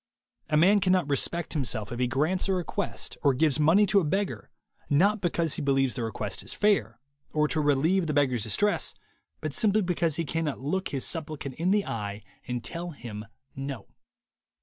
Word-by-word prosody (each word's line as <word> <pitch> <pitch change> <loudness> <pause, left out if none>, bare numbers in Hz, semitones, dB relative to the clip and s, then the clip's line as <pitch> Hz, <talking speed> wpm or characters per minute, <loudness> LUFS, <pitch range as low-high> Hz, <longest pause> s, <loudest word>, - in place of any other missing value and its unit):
A 150 - +3
man 195 +6 +6
cannot 185 -4 +2
respect 160 +4 0
himself 120 -8 -2
if 120 - -4
he 125 - +2
grants 155 +10 0
a - - +3
request 180 -2 -3
or 140 -3 +3
gives 155 +2 +2
money 165 +8 +5
to 200 +1 +4
a - - 0
beggar 150 - -2 0.4
not 195 +8 +3
because 170 -3 0
he - - -4
believes 135 -2 +2
the 125 - -4
request 110 -2 -4
is - - -6
fair, 145 - +1 0.3
or 150 0 +1
to 155 - +1
relieve 155 +5 +2
the 150 - -1
beggar's 130 -5 +2
distress, 205 - 0 0.5
but - - -3
simply 215 -2 +2
because 170 -3 0
he 165 +1 -2
cannot 155 -1 -2
look 185 +8 -1
his 135 -2 -2
supplicant 155 -4 -3
in 170 +7 -1
the 205 +1 +2
eye 105 -2 -4 0.2
and 125 -1 -3
tell 170 +9 -5
him 115 -8 -8 0.3
No. 135 0 -6
150 Hz, 185 wpm, -27 LUFS, 130-180 Hz, 0.5 s, man